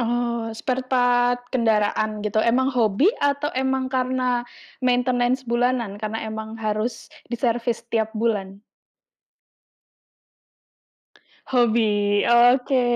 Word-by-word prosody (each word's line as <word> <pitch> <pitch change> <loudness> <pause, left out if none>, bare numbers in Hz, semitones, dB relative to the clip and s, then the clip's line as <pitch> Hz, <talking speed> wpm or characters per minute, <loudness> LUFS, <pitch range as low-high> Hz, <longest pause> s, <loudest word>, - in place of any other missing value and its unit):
Oh, 235 -1 -1
sparepart 245 -1 0
kendaraan 215 -3 0
gitu, 215 +1 +1
emang 260 +4 +2
hobi 245 - +2
atau 285 +1 0
emang 265 0 -1
karena 255 -1 0 0.4
maintenance 250 0 +1
bulanan 235 -3 -1
karena 220 +1 -4
emang 220 +1 -6
harus 215 +2 -3 0.2
diservis 235 -1 -1
setiap 225 -2 -1
bulan? 205 -3 -2 2.9
Hobi, 235 -3 +3 0.5
oke. 250 +2 +4
240 Hz, 90 wpm, -23 LUFS, 220-255 Hz, 2.9 s, oke